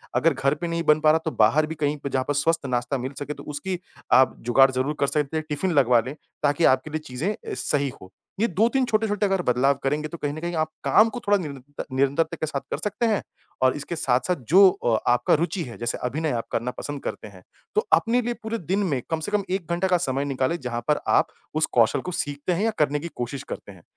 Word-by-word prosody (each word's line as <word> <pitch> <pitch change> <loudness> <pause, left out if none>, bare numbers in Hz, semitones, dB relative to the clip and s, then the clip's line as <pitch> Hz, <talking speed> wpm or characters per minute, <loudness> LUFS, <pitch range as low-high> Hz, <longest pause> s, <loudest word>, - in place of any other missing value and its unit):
अगर 165 -2 +3
घर 135 +2 +1
पे 170 +3 -4
नहीं 170 0 -2
बन 155 0 +4
पा 155 - +4
रहा 160 - +3
तो 160 - 0
बाहर 125 +8 +4
भी 160 - -5
कहीं 150 -1 -1
पे 140 -1 -5
जहाँ 130 -1 0
पर 145 - +1
स्वस्थ 165 +2 +1
नाश्ता 125 +1 -1
मिल 130 +2 -4
सके 145 +1 -4
तो - - -11
उसकी 170 +5 -4 0.3
आप 130 +1 +5
जुगाड़ 135 +3 +5
ज़रूर 130 +4 -1
कर 140 - +2
सकते 150 +2 -1
हैं, 155 - -3
टिफिन 175 +5 -1
लगवा 125 -5 +4
लें 135 +3 -6 0.3
ताकि 145 +3 +2
आपके 130 +3 -3
लिए 155 - -2
चीजें 130 +11 -2
अ, - - -12 0.2
सही 140 -2 0
हो। 95 - -13 0.3
ये 230 - +3
2-3 230 - +2
छोटे-छोटे 215 -2 +1
अगर 195 -2 +1
बदलाव 130 -1 +3
करेंगे 150 +3 0
तो 170 - -8
कहीं 145 -2 -3
न 155 - -6
कहीं 175 0 -3
आप 155 - -1
काम 220 +2 +5
को 245 - -6
थोड़ा 205 0 +5
निरंत 145 -4 -7
निरंतरता 140 +5 +1
के - - +2
साथ 145 -3 -3
कर - - -1
सकते 210 +3 -1
हैं। 215 -3 +1 0.4
और 130 +1 +4
इसके 150 +4 -5
साथ-साथ 130 +4 +1
जो 190 +3 +8
अ, 115 -10 0
आपका 120 0 +3
रुचि 170 +3 0
है 120 -5 -9
जैसे 120 0 -2
अभिनय 155 +3 -1
आप - - -28
करना 120 +2 -1
पसंद 145 -1 -5
करते - - -5
हैं। 95 -3 -15 0.3
तो 430 +1 +1
अपने 240 +2 +4
लिए 240 +1 -2
पूरे 220 +1 -2
दिन 190 +2 -1
में 130 - -1
कम 160 - 0
से 160 +6 -5
कम 210 -1 +1
1 185 -3 -2
घंटा 175 +2 +1
का 180 -1 +3
समय 135 +2 -1
निकालें 135 +4 -1
जहाँ 120 -1 -3
पर 150 - +2 0.2
आप - - +3 0.3
उस 155 - +3
कौशल 115 - +4
को - - -3
सीखते 145 +5 -3
हैं 180 +4 -1
या 225 - +2
करने 150 -1 +2
की 170 +3 -6
कोशिश 125 +2 -4
करते 100 - -10
हैं। 90 -3 -16
150 Hz, 250 wpm, -24 LUFS, 135-175 Hz, 0.4 s, जो